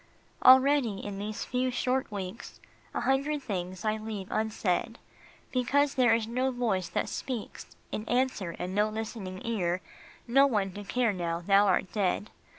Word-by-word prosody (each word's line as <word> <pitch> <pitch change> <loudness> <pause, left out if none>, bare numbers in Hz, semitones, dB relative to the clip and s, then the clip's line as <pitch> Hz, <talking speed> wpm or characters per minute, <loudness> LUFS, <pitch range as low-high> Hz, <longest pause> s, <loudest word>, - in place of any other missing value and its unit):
Already, 260 -4 +6
in 200 -1 -5
these 210 +1 -4
few 255 +1 0
short 255 0 -1
weeks, 200 +2 -6 0.3
A - - -2
hundred 280 +2 +1
things 185 -3 -4
I 215 0 +1
leave 215 -3 -6
unsaid, 220 0 -1 0.5
Because 275 +3 +2
there 245 -4 +4
is 225 -1 -1
no 250 +4 0
voice 220 -8 -1
that - - -1
speaks 245 -5 -5 0.2
In 215 +1 -4
answer, 245 -9 0
and 180 +1 -4
no 210 +2 +2
listening 215 -4 -5
ear, 185 -6 0 0.5
No 275 +4 +6
one 205 -7 0
to 205 +3 -8
care 235 +1 +1
now 170 -2 -2
thou 200 +3 +4
art 190 -1 +1
dead 205 0 0
220 Hz, 155 wpm, -29 LUFS, 195-250 Hz, 0.5 s, Already